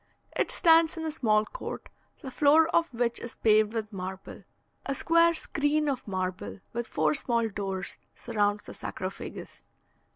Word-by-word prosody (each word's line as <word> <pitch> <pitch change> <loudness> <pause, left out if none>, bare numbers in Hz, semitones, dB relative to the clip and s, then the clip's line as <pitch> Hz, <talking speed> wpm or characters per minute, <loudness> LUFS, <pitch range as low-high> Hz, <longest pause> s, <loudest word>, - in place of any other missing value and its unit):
It - - +1
stands 330 0 +4
in 320 - -4
a 315 - -1
small 215 -8 +2
court, - - -7 0.3
the 265 - -6
floor 305 +4 +5
of 335 -2 +2
which 235 -1 0
is 235 - -7
paved 215 -1 +3
with 220 -2 -4
marble. 190 0 -7 0.4
A 275 - -1
square 335 +4 +4
screen 300 0 0
of 265 -5 -2
marble, 185 0 -4
with 235 0 -3
four 155 -1 +1
small 230 +7 0
doors, 195 -2 -4 0.2
surrounds 205 -3 0
the - - -9
sarcophagus. 185 +1 -7
235 Hz, 155 wpm, -28 LUFS, 205-300 Hz, 0.4 s, floor